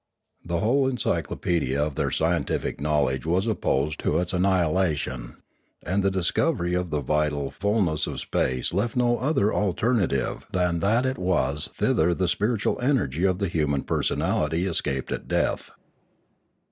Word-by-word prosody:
The 85 0 -2
whole 130 +6 +3
encyclopaedia 85 - -1
of 75 0 0
their - - -1
scientific - - -1
knowledge 70 -4 +1
was 90 +5 +1
opposed 75 -9 0
to - - 0
its 90 +1 -1
annihilation, 85 -9 0 0.5
and 100 +2 +1
the 100 - +2
discovery 95 - 0
of 90 0 -1
the 75 -2 -1
vital 75 0 0
ful 105 +2 +1
ness 80 -4 -1
of - - -4
space 65 +3 -1
left 105 +5 0
no 120 -1 +2
other 125 -5 +1
alternative 100 - 0
than 90 -2 +1
that 110 +8 +2
it 130 0 -1
was 75 -6 0
thither 85 +2 +2
the 90 0 0
spiritual 105 +4 0
energy 95 - +1
of 95 -2 +2
the 100 0 -1
human 75 -5 0
personality 80 +4 0
escaped 70 -7 -2
at - - -4
death. - - 0
90 Hz, 145 wpm, -25 LUFS, 75-100 Hz, 0.5 s, whole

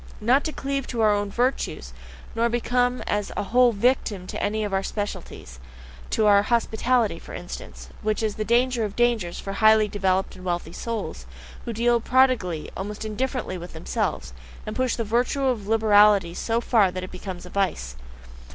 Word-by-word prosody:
Not 250 +6 +3
to 310 - -1
cleave 275 -2 -3
to 235 -2 -2
our 215 -1 +5
own 205 0 -1
virtues, 250 +6 -1 0.4
nor 230 +1 +1
become 245 +1 0
as 205 -1 -1
a - - 0
whole 245 +4 +4
a - - -2
victim 205 -4 0
to - - -5
any 215 +1 0
of 205 -2 -3
our 195 - +2
specialties, 195 - -6 0.5
to 220 - +1
our 200 -1 +6
"hospitality" 235 +1 +1
for - - -10
instance, - - -8
which 215 +1 -1
is 215 -1 0
the 215 - -3
danger 240 +1 +2
of 210 -2 -4
dangers 235 -8 +1
for 195 - -5
highly 215 +1 +5
developed 190 -2 0
and 185 - -12
wealthy 175 -2 -3
souls, 205 - -5 0.4
who 235 - -3
deal 235 +1 +2
prodigally, 245 -11 +2
almost 210 +3 -5
indifferently 220 -3 -3
with 175 +1 -9
themselves, 160 - -3 0.3
and 215 - -5
push 255 -1 0
the 230 - -2
virtue 240 +5 0
of 235 -6 -1
liberality 210 -4 +4
so 230 +5 -1
far 220 -5 +3
that 185 0 -5
it 185 - -7
becomes 185 -1 -7
a 180 - -11
vice. 185 - -1
215 Hz, 180 wpm, -24 LUFS, 195-240 Hz, 0.5 s, our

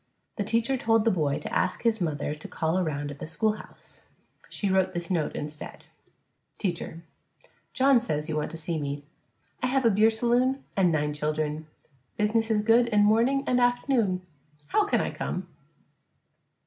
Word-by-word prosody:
The 205 - 0
teacher 230 +5 +1
told 225 -2 +2
the 225 - +4
boy 150 -6 0
to - - -7
ask 185 - 0
his 225 -3 +2
mother 150 -3 -1
to 150 - -9
call 160 +3 -1
around 145 -4 -2
at 145 - -10
the - - -6
schoolhouse. 215 +6 -4 0.4
She 205 - -2
wrote 190 -1 +2
this 175 +1 -4
note 160 -4 0
instead: 150 0 -7 0.7
Teacher: 170 -3 -4 0.7
John 265 -1 +5
says 150 -10 -2
you 160 - -2
want 150 0 -1
to 165 - -8
see 160 0 -3
me. 145 0 -4 0.6
I 250 - +1
have 265 0 +1
a 230 - +6
bier 215 +3 +5
saloon 245 +4 +1
and 185 -3 +3
nine 150 -1 0
children. 150 +1 -2 0.5
Bizness 225 +2 +1
is 210 -2 +2
good 230 +2 +5
in 210 -3 +3
morning 235 +6 +3
an' 250 - +2
aft'noon. 245 -6 +2 0.5
How 425 - +3
can - - +2
I - - -2
come? - - -4
195 Hz, 170 wpm, -27 LUFS, 155-230 Hz, 0.7 s, a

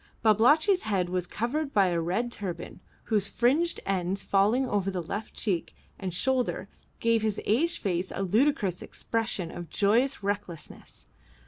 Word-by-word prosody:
Babalatchi's 295 - +5
head 190 -5 0
was 180 -1 -2
covered 275 - -2
by 195 -3 +5
a 170 -1 0
red 200 +9 -1
turban, 180 -7 -6 0.2
whose 210 -3 +1
fringed 280 +11 +2
ends 190 0 -1
falling 215 +7 +2
over 200 -4 0
the 185 -2 -2
left 200 +6 -5
cheek 185 -7 -2 0.2
and 190 -2 -3
shoulder 255 +8 -1 0.3
gave 230 -1 +2
to 220 - +1
his 210 - -2
aged 310 +11 +2
face 185 -2 -2
a 195 - -2
ludicrous 205 - +1
expression 220 -7 -2
of 175 -2 -8
joyous 225 - +2
recklessness. 200 -5 -5
205 Hz, 150 wpm, -28 LUFS, 185-240 Hz, 0.3 s, Babalatchi's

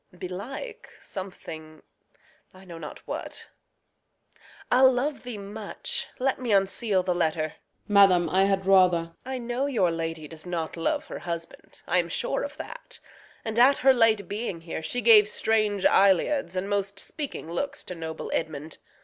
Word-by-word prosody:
Belike, 260 - -7
Something 160 -5 -8 0.7
I 190 +1 -15
know 170 -2 -9
not 150 -2 -9
what - - -6 1.2
I'll 260 +1 +7
love 270 +3 -1
thee 245 -3 -6
much 205 +1 -4
Let 265 0 0
me 245 -3 -1
unseal 195 0 +2
the 180 - 0
letter. 160 -2 0
Osw. 155 - -8 0.4
Madam, 185 -4 +6
I 190 +4 +3
had 195 -1 0
rather 185 -2 +6
Reg. 165 0 -8
I 260 0 -3
know 245 +3 -2
your 205 -11 +2
lady 165 -1 -4
does 160 +2 -10
not 165 -3 -3
love 290 - -1
her - - -7
husband; 170 -1 -7
I - - +2
am - - -1
sure - - -1
of - - -6
that; - - -9 0.5
and 220 +1 -1
at 270 +3 +6
her 265 +1 +5
late 220 -5 +3
being 200 -4 -4
here 165 -1 -5
She 245 +9 -1
gave 215 -2 +8
strange 215 -2 +1
eliads 195 - +3
and 185 +1 -2
most 200 -1 -1
speaking 280 - -6
looks 280 +11 -3
To - - -7
noble 160 -2 -6
Edmund. 155 -1 -3
195 Hz, 165 wpm, -26 LUFS, 170-245 Hz, 1.2 s, gave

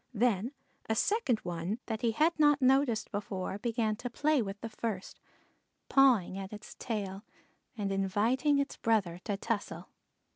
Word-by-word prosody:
Then 230 +2 +1 0.4
a 220 - +2
second 340 - +2
one 175 +4 -3
that 220 -1 -3
he 235 - +2
had 315 +7 +3
not 295 -1 +5
noticed 265 -3 +3
before 200 -1 -3
began 225 -1 0
to 245 - -5
play 295 +3 +2
with 200 -2 -5
the 230 - -4
first, 215 -4 -5 0.7
pawing 240 -9 +4
at 195 0 -6
its 210 0 -9
tail 200 -4 -3 0.5
and 200 -2 -1
inviting 215 +9 +2
its 280 0 -1
brother 195 -7 +1
to 205 - -1
tussle. 200 -6 -3
220 Hz, 150 wpm, -31 LUFS, 195-255 Hz, 0.7 s, not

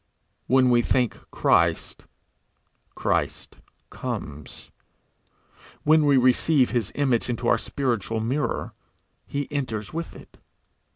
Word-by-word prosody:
When 130 0 +4
we 120 -1 +5
think 125 0 +1
Christ, - - +1 0.9
Christ - - -2 0.3
comes; 75 0 -7 1.1
when 155 0 +4
we 140 -2 +5
receive 130 +2 +3
his 120 -4 -1
image 130 -4 +1
into 120 0 -2
our 120 - +3
spiritual 115 -5 -2
mirror, 130 +7 -2 0.5
he 140 -1 -3
enters 120 -7 -3
with 165 +1 -5
it. - - -15
125 Hz, 105 wpm, -24 LUFS, 115-140 Hz, 1.1 s, we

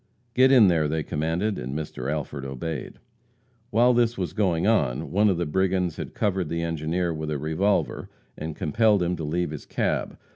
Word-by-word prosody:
"Get 130 +2 +5
in 120 -6 +7
there!" 80 -4 +2
they 80 +1 -1
commanded, 80 +9 -1
and 65 +4 -4
Mr. 70 -3 -4
Alford 75 -2 -4
obeyed. 70 +2 -5 0.7
While 120 +3 +4
this 120 -1 +2
was 90 -3 -3
going 95 -5 +1
on, 75 - +1
one 105 +3 +4
of 95 - +1
the 85 - -1
brigands 90 +1 0
had - - -6
covered 95 -5 0
the 85 0 -2
engineer 85 +2 -1
with 80 -1 -4
a 75 - -1
revolver, 80 +8 0 0.3
and 80 0 -6
compelled 105 +4 +2
him 90 +1 0
to 80 - -5
leave 85 +2 -1
his 75 - -8
cab. - - -1
85 Hz, 185 wpm, -25 LUFS, 75-100 Hz, 0.7 s, in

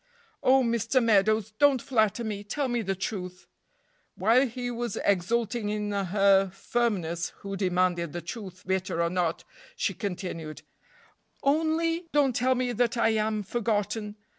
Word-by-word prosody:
"Oh, 265 +1 +5
Mr. 230 +1 0
Meadows! 215 -2 +3
don't 285 -3 +5
flatter 225 -3 +1
me; 210 -2 -4
tell 275 +7 -2
me 240 -1 0
the 195 -2 -2
truth." 185 -1 -5 0.7
While 230 +8 +4
he 245 +1 -4
was 240 -2 -3
exulting 210 +3 +1
in 210 0 -2
her 195 0 +3
firmness, 190 -4 -1
who 195 0 -5
demanded 180 -3 0
the 175 - -5
truth, 185 0 -8
bitter 190 -2 -1
or 170 0 +1
not, 175 -3 -1 0.3
she - - -1
continued: 180 -6 -5 0.8
"Only 325 +3 +1
don't 280 -4 +3
tell 255 +1 +2
me 250 0 0
that 240 0 0
I 230 - +3
am 215 -1 0
forgotten!" 210 -1 -2
210 Hz, 140 wpm, -27 LUFS, 190-240 Hz, 0.8 s, Oh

